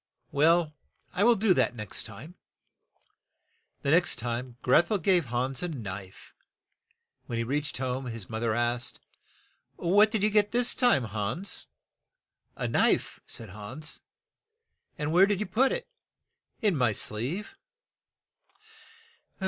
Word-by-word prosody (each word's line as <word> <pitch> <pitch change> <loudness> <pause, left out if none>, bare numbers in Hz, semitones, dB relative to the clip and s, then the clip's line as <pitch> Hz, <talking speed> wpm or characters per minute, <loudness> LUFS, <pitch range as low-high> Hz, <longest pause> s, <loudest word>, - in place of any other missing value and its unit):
Well, 160 +2 +3 0.4
I 195 - +1
will 235 +1 +6
do 200 -2 +3
that 125 -8 +2
the - - -15
next 105 -3 -4
time." 115 - -11 1.5
The 140 - +1
next 175 +2 +4
time, 120 +1 -4
Greth 155 +7 +4
el 210 - +2
gave 180 -2 +2
Hans 125 +2 -1
a 180 - -1
knife. 95 - -8 0.9
When 115 - -3
he 115 - 0
reached 145 +5 -2
home 130 0 -3
his 115 -5 -7
moth 110 -1 -5
er 115 -2 +1
asked, 120 +1 -1 0.8
"What 205 +5 +4
did 215 -2 -1
you 210 - +3
get 210 0 +3
this 245 0 +4
time, 245 - +3
Hans?" 110 - -3 0.9
"A - - -2
knife," - - +1
said 115 - -5
Hans. 120 - -6 1.0
"And 150 +1 -2
where 185 +4 +6
did 205 -2 0
you 215 - -1
put 260 +6 +2
it?" - - -3 0.8
"In 205 -5 +3
my 125 -6 +2
sleeve." 140 - 0
140 Hz, 140 wpm, -28 LUFS, 115-190 Hz, 1.5 s, will